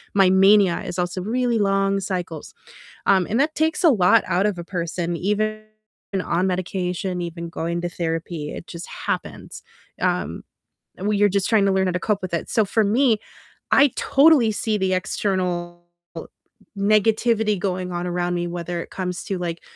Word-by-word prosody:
my 195 -2 +5
mania 190 -1 +5
is 180 - -5
also 180 +1 -2
really 235 +3 0
long 195 -1 +1
cycles, 180 -5 -5 0.5
um, 190 -3 +4
and 225 +5 +1
that 305 +2 +1
takes 320 +2 0
a 335 - +8
lot 190 -9 +4
out 185 +1 +1
of 205 -4 -2
a 170 - -6
person, 170 -1 -3
even 215 +4 -1 0.6
on 175 +2 0
medication, 180 0 -2
even 170 0 -6
going 170 0 -3
to 175 - -2
therapy, 165 -2 -4
it - - -8
just 170 0 -8 0.2
happens, - - -4 0.4
um, - - -1 0.6
and 190 - -4
when 210 -1 +1
you're 205 0 +5
just 200 0 0
trying 215 -3 +4
to 195 - +3
learn 190 0 +2
how - - +1
to 180 - -1
cope 205 0 -1
with 185 - -5
it, 170 - -2
so 220 -4 +2
for 220 +3 +1
me, 225 +2 +3 0.5
I 275 -1 +5
totally 280 -5 +4
see 215 0 -1
the 190 -1 +1
external 180 -2 -2 0.9
negativity 215 +1 +2
going 180 -1 -2
on 175 0 -3
around 175 0 -1
me, 175 0 -2
whether 175 0 -4
it - - -9
comes 180 -1 -4
to, 195 - -3
like, 170 -1 -4
185 Hz, 175 wpm, -22 LUFS, 175-210 Hz, 0.9 s, a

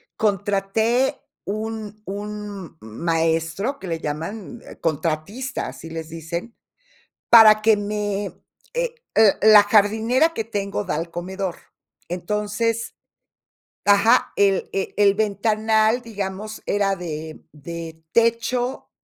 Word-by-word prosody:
contraté 215 +6 +1 0.3
un 215 0 -5
un 205 -3 -6
maestro, 165 - -1
que 190 - -8
le 165 -1 -2
llaman 165 +8 -5 0.2
contratista, 165 - -2
así 140 +5 -9
les 160 0 -6
dicen, 170 +7 -6 0.7
para 215 -2 +8
que 220 -1 +4
me, 205 -1 -3 0.4
eh - - -2 0.2
l 220 -3 +6
la 215 -1 +8
jardinera 220 +9 +3
que 225 - -2
tengo, 205 -2 -3
da 180 -6 -2
al 165 +2 -4
comedor. 185 +1 -4 0.5
Entonces 210 +5 -2 0.9
Ajá. 205 +5 +4
El 195 -2 +2
e 195 - -3
el 200 -1 +5
ventanal, 220 +2 +1
digamos, 210 -1 -6
era 200 -1 +1
de 160 -2 -6
de 160 +2 -8
techo 235 +2 +1
205 Hz, 105 wpm, -22 LUFS, 175-220 Hz, 0.9 s, para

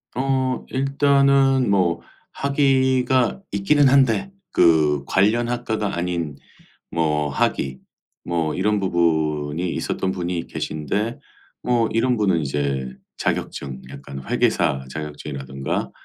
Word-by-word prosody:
어. 130 0 0
일단은 135 -1 +3
뭐 85 -4 +2 0.3
학위가 130 0 +2
있기는 135 +9 +3
한데 140 - +3 0.2
그 75 -4 +4
관련 110 +8 +2
학과가 110 -5 -2
아닌 85 -4 -2 0.6
뭐 75 -3 0
학위 65 -1 -1 0.5
뭐 85 -3 -1
이런 105 +3 +1
부분이 80 -2 0
있었던 95 - -2
분이 90 -2 -3
계신데 100 - -3 0.4
뭐 120 -2 +2
이런 125 +2 +2
분은 95 -6 +2
이제 70 -2 -2 0.2
자격증 65 -2 -3
약간 70 0 -8
회계사 65 0 +1
자격증이라든가 70 -3 -4
95 Hz, 225 characters per minute, -22 LUFS, -, 0.6 s, 그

